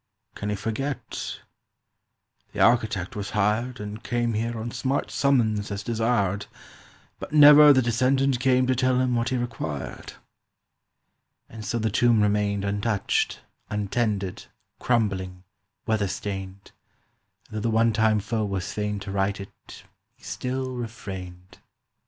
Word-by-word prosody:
—Can 100 - -5
he 105 - 0
forget? 115 +7 -4 1.1
"The - - -6
architect 110 -2 +2
was 105 -1 -4
hired 110 +5 0
And 105 +2 -7
came 120 -1 -1
here 115 +2 -2
on 115 +2 -4
smart 130 +4 -2
summons 110 -7 +1
as 100 0 -4
desired, 110 -4 0 0.7
But - - -8
never 150 0 +9
the 130 -2 +4
descendant 130 +2 +2
came 130 0 +3
to 130 - +2
tell 130 0 +2
him 130 -1 +1
What 120 +1 0
he 130 - 0
required." 115 - -5 1.3
And 110 -1 -10
so 120 - -2
the 110 -1 -1
tomb 115 0 +3
remained 100 -1 +1
Untouched, 100 +1 0 0.3
untended, 105 -2 -2 0.3
crumbling, 95 -6 -1 0.4
weather 110 -3 +1
stained, 95 0 -6 0.8
And 110 - -6
though - - -2
the 115 - 0
one 115 0 +3
time 110 -1 +3
foe 110 +2 -2
was 100 -3 -3
fain 105 -1 -2
to 95 - -6
right 100 +1 0
it 100 - -12 0.3
He - - -28
still 130 +1 -3
refrained. 95 -7 -8
110 Hz, 135 wpm, -25 LUFS, 100-120 Hz, 1.3 s, never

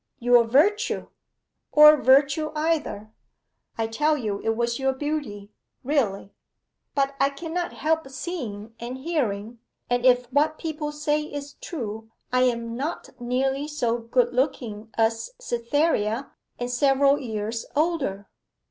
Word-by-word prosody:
'Your 245 -1 +5
virtue.' 400 - +2 0.6
'Or 300 0 +9
virtue 280 +3 +3
either.' 300 -9 -1 0.7
'I 225 - 0
tell 300 +7 +1
you 210 -6 -3
it 225 0 +1
was 235 +1 0
your 265 0 +1
beauty 260 -8 -4 0.3
really.' 235 -9 -1 0.6
'But 275 -1 +1
I 275 - +4
cannot 335 +5 -4
help 320 -2 0
seeing 245 - -6
and 245 +2 -5
hearing, 240 -7 -2 0.3
and 245 0 +1
if 250 -1 +5
what 305 +2 +2
people 305 -2 -4
say 295 0 0
is 290 -1 -7
true, 220 -7 -6 0.2
I 255 0 +4
am 235 -2 -1
not 285 +7 -4
nearly 265 +3 0
so 240 -6 -1
good 240 +1 +1
looking 240 -5 -2
as 225 - 0
Cytherea, 240 - 0 0.3
and 245 0 -3
several 275 +2 +3
years 220 -1 -4
older. 290 - 0
260 Hz, 130 wpm, -25 LUFS, 230-300 Hz, 0.7 s, Or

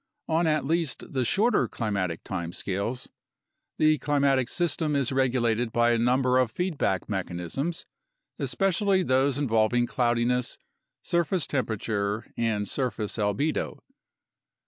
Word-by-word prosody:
On 165 +1 +2
at 155 -3 +1
least 165 -1 -1
the 130 -2 +1
shorter 215 - +2
climatic 100 -7 -2
time 85 -3 -4
scales, 100 +7 -3 0.7
the 155 -1 +4
climatic 140 -3 +2
system 160 -3 0
is 140 -3 +1
regulated 120 -3 +1
by 120 +1 +3
a 115 - +2
number 125 +2 +3
of 130 -3 +2
feedback 150 - -1
mechanisms, 95 - -3 0.5
especially 195 0 +1
those 130 -1 +2
involving 120 -3 +2
cloudiness, 120 0 0 0.5
surface 170 0 0
temperature, 110 -4 -2
and 110 -3 -1
surface 110 -3 -2
albedo. 125 +10 -1
125 Hz, 115 wpm, -27 LUFS, 110-150 Hz, 0.7 s, the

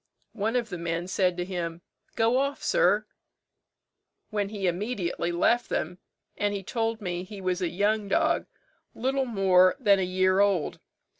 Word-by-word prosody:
One 220 +2 -1
of 235 -3 0
the 180 -3 -5
men 170 +1 -2
said 185 -2 +1
to 175 - -2
him, 175 -2 -4 0.3
'Go 230 +2 +3
off, 280 +1 -2
sir,' - - +3 1.3
when 205 -2 -1
he 205 -2 -4
immediately 180 -2 -1
left 235 +8 +2
them; 175 +3 -2 0.4
and 205 0 -1
he 195 - -5
told 225 +2 -2
me 180 -2 -3
he 200 +2 -9
was 185 -1 -1
a 175 - 0
young 205 +3 0
dog, 195 - +1 0.5
little 265 +2 0
more 190 -5 +4
than 200 -6 +4
a - - +1
year 185 +1 +2
old. 200 -6 +1
195 Hz, 160 wpm, -27 LUFS, 180-220 Hz, 1.3 s, more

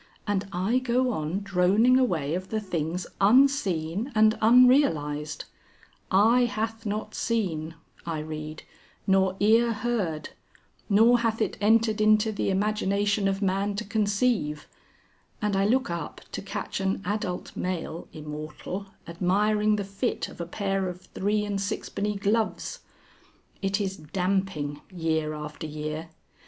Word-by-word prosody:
And 205 -1 -1
I 195 +8 +1
go 255 0 +1
on 165 0 -2
droning 200 +6 +4
away 160 - 0
of 185 +2 -3
the 220 - -1
things 175 -3 -3 0.2
unseen 210 - +3
and 215 0 +5
unrealised 215 - +4 0.6
'Eye 225 +6 +5
hath 225 0 -3
not 210 +1 -3
seen,' 165 -9 -2 0.3
I 165 -2 -3
read, 155 0 -6 0.4
'nor 190 -1 +3
ear 225 +3 +4
heard, 205 -9 -2 0.6
nor 225 +4 +5
hath 230 -1 0
it 220 - 0
entered 220 0 +3
into 215 +1 +4
the 205 - -1
imagination 205 0 +1
of 195 +1 -1
man 195 +1 0
to 220 - -3
conceive,' 205 -6 0 0.7
and 210 -1 0
I 195 0 +2
look 255 -3 +1
up 170 -3 -5
to - - -4
catch 195 +1 -4
an 195 0 -1
adult 185 -2 -3
male 175 -2 -4
immortal 155 +5 -6 0.2
admiring 210 +5 +2
the 205 - -2
fit 200 +5 -2
of - - -9
a 170 - -4
pair 195 0 -1
of 180 0 -7
three 210 +3 -1
and 200 -1 -2
sixpenny 205 +1 -2
gloves. 220 - -1 0.8
It 195 +1 0
is 195 -2 -2
damping 180 -3 -2
year 160 -3 -1
after 150 +1 -6
year. 155 +2 -5
200 Hz, 135 wpm, -27 LUFS, 170-215 Hz, 0.8 s, and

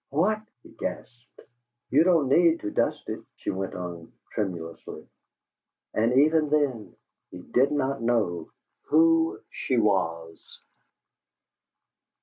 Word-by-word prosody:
"WHAT!" 200 +9 +1 0.2
he - - -15
gasped. 120 0 -8 0.5
"You 150 +4 +5
don't 165 -6 +3
need 165 +4 +4
to 105 - -4
dust - - -1
it!" - - -5
she - - -4
went 95 0 -4
on, 85 -2 -7 0.2
tremulously. 85 -5 -5 0.9
And 115 +3 +2
even 155 0 +3
then 145 -7 0 0.3
he - - -10
did 130 +8 +2
not 135 -3 -1
know 105 -9 0 0.4
who 165 +1 +3
she 130 - -2
was. 85 -6 -1
125 Hz, 115 wpm, -26 LUFS, 95-155 Hz, 0.9 s, You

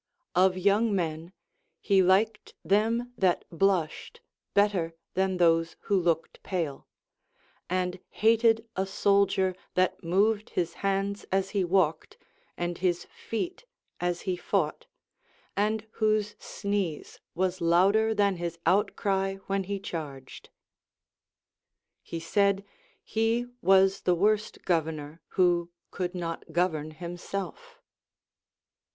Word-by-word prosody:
Of 185 +1 +4
young 200 +3 +3
men, 165 -1 -2 0.5
he 195 -2 +3
liked 205 +4 +2
them 225 +6 +1
that 185 -2 +2
blushed 185 - 0 0.4
better 195 -5 +2 0.2
than 190 0 +1
those 165 -1 +3
who 200 - 0
looked 165 -2 -1
pale; 165 -8 -3 0.8
and 180 0 -1
hated 225 +1 +3
a 190 +1 -1
soldier 195 -1 +2 0.2
that 185 0 +1
moved 205 +5 +2
his 170 -2 0
hands 195 +1 -1
as 195 0 +1
he 200 -3 +1
walked 175 -3 +1 0.4
and 175 0 -3
his 175 -1 0
feet 350 - -4 0.3
as 175 0 -1
he 185 -2 -1
fought, 175 -3 -1 0.7
and 215 +2 0
whose 215 -2 +1
sneeze 200 -6 -3 0.2
was 185 +1 -1
louder 195 +6 +4
than 200 -2 +2
his 170 -1 -4
outcry 195 0 +1
when 195 -1 -1
he 200 +1 -3
charged. 150 -8 -7 1.5
He 165 - -6
said, 200 +4 +1 0.4
he 225 +2 0 0.2
was 190 0 +4
the 180 - +2
worst 210 +4 0
governor 160 -2 -1 0.2
who 175 -2 +3 0.2
could 180 0 -3
not 165 -2 -5
govern 160 -3 0
himself. 180 - -6
190 Hz, 110 wpm, -28 LUFS, 175-205 Hz, 1.5 s, Of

